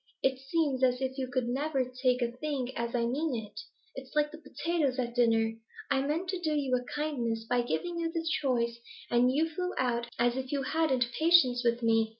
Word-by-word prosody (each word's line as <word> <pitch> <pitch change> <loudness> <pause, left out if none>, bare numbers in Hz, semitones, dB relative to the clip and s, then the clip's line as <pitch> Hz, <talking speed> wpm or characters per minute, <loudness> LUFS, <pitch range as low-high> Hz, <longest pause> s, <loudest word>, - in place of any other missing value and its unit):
It 265 -1 +2
seems 270 -1 0
as 250 -1 +3
if 265 0 -3
you 260 - -1
could 250 -1 -1
never 270 +1 0
take 250 0 0
a 235 - -1
thing 260 -1 -3
as 235 +1 -2
I 235 -1 +1
mean 280 +4 -1
it. 215 -2 -6 0.3
It's 265 +2 -10
like 300 0 +2
the 315 - -10
potatoes 300 -2 -1
at 240 -2 -2
dinner; 225 -2 +3 0.4
I 270 -1 +3
meant 305 +6 -1
to 370 -1 -1
do 310 -3 0
you 275 -3 +1
a 250 - -1
kindness 245 -7 -1
by 245 +2 +1
giving 340 +8 -2
you 330 -1 -1
the 330 -1 -3 0.2
choice, 235 -4 0 0.3
and 245 +1 +4
you 310 +5 +2
flew 360 +3 -3
out 240 -2 0
as 240 +1 +2
if 260 -1 -4
you 280 -2 0
hadn't 265 -6 +1
patience 310 -7 +5
with 235 0 +1
me.' 225 -1 +3
260 Hz, 210 wpm, -30 LUFS, 240-300 Hz, 0.4 s, patience